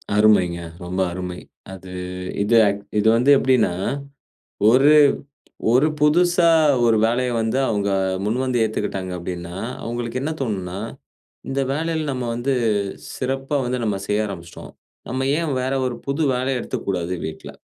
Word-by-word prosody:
அருமைங்க. 100 -5 +4 0.3
ரொம்ப 90 +2 -2
அருமை. 90 0 -5 0.3
அது 95 -1 -10 0.5
இது 110 +3 +2
ஆ - - +4 0.3
இது 105 - +2
வந்து 125 +4 +4
எப்படின்னா, 130 -9 +2 1.0
ஒரு 135 +5 +6 0.8
ஒரு 130 +5 +4
புதுசா 175 +3 +4 0.4
ஒரு 115 -1 +4
வேலைய 125 +2 0
வந்து 110 +3 0
அவங்க 100 -2 0 0.4
முன்வந்து 125 +3 0
ஏத்துக்கிட்டாங்க 100 -4 -3
அப்படின்னா, 85 0 -6 0.3
அவங்களுக்கு 120 +1 -3
என்ன 150 - -2
தோணுனா? 95 -7 -3 0.7
இந்த 135 +1 -1
வேலையில 160 +1 -1
நம்ம 125 -1 -3
வந்து 120 +4 -1 0.6
சிறப்பா 135 +2 -2
வந்து 125 +1 -1
நம்ம 105 -3 0
செய்ய 105 +1 +1
ஆரம்பிச்சுட்டோம். 85 -4 -9 0.4
நம்ம 130 +1 -1
ஏன் 165 -3 -1
வேற 130 +1 -1
ஒரு 125 - -2
புது 140 +3 -1
வேலைய 130 +1 -1
எடுத்துக்க - - -5
கூடாது 90 -2 -1
வீட்ல. 80 0 -8
120 Hz, 135 wpm, -22 LUFS, 95-135 Hz, 1.0 s, ஒரு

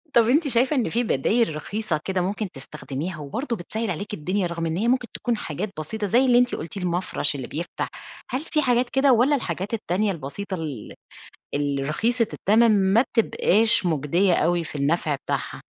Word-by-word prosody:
طب، 230 -1 +5
أنتِ 295 +4 +3
شايفة 255 +3 +3
إن 250 -5 +1
في 240 +2 +1
بدايل 215 - +1
رخيصة 190 +1 -2
كده 190 -1 0
ممكن 200 +2 -2
تستخدميها 150 +4 -6
وبرضو 235 - -3
بِتسَهِّل 220 +3 -4
عليكِ 200 +5 -5
الدنيا 185 +2 -1
رغم 170 -1 -3
إن 165 0 -1
هي 225 +5 0
ممكن 250 -1 +2
تكون 235 -2 -1
حاجات 185 +6 -4
بسيطة 205 +7 -3
زي 245 +7 +4
اللي 245 -1 +5
أنتِ 245 0 +2
قُلتي، 170 +5 -6
المَفرش 175 -4 -1
اللي 130 -3 -5
بيفتح؟ 170 +3 -4 0.4
هل 260 - -2
في 310 -1 0
حاجات 245 -2 +2
كده 270 +1 +4
والّا 250 +5 +4
الحاجات 190 - -3
التانية 205 -1 0
البسيطة 185 +5 -5
ال 155 -5 -6 0.6
الرخيصة 150 - 0
التّمن 210 -2 +3
ما 230 - +6
بتبقاش 225 -4 +2
مُجدية 170 +4 +2
أوي 170 +1 +2
في 155 - -9
النفع 150 +1 +1
بتاعها؟ - - -4
200 Hz, 175 wpm, -24 LUFS, 165-235 Hz, 0.6 s, ما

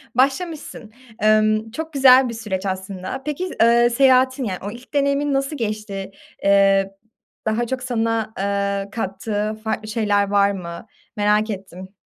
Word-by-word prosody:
başlamışsın. 275 -3 -1 0.3
Emm, 215 +1 +2
çok 320 +6 -6
güzel 260 -2 +6
bir - - -5
süreç 210 -4 -4
aslında. 190 +3 -4
Peki, 300 +5 -3
eee, 235 +1 +5
seyahatin 260 +1 +3
yani, 190 -6 -3
o 205 - -4
ilk 245 +3 -13
deneyimin 280 0 +1
nasıl 275 +2 -1
geçti? 210 -4 -4 0.3
Eee, 195 -1 +4 0.6
daha 225 +2 0
çok 255 +1 -3
sana, 225 -3 -1
eee, 200 0 -1
kattığı 210 0 -3
farklı 220 0 -3
şeyler 210 -2 +1
var 200 0 +3
mı? 170 -1 -7 0.3
Merak 210 +1 +2
ettim. 190 -1 -8
215 Hz, 140 wpm, -21 LUFS, 200-255 Hz, 0.6 s, güzel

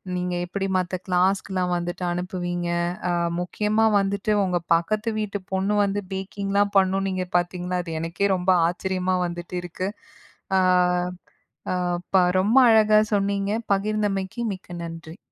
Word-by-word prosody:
நீங்க 180 0 -2
எப்பிடி 195 +2 -3
மத்த 185 0 -1
கிளாஸ்க்குலாம் 185 0 +1
வந்துட்டு 175 +1 -4
அனுப்புவீங்க. 175 -1 -3 0.4
அ - - +1 0.3
முக்கியமா 210 +5 +1
வந்துட்டு, 200 +1 -1
உங்க 180 -2 0 0.2
பக்கத்து 210 +7 -1
வீட்டு 205 -1 -3
பொண்ணு 190 +2 0
வந்து 200 0 -1
பேக்கிங்லாம் 200 +1 -1
பண்ணும் 195 0 +2
நீங்க 185 -1 -2
பாத்தீங்கன்னா, 180 +1 -2
அது 165 -2 -5
எனக்கே 170 +5 0
ரொம்ப 180 0 -2 0.2
ஆச்சரியமா 185 +1 -1
வந்துட்டு 175 +1 -6
இருக்கு. 180 +2 -4 0.7
அ - - +5 1.1
அ - - 0 0.4
ப - - +7 0.2
ரொம்ப 215 +7 +4
அழகா 215 -1 +5 0.2
சொன்னீங்க, 200 0 0 0.2
பகிர்ந்தமைக்கு 205 +1 -1
மிக்க 180 -2 -10
நன்றி. 165 0 -8
190 Hz, 130 wpm, -24 LUFS, 180-200 Hz, 1.1 s, ப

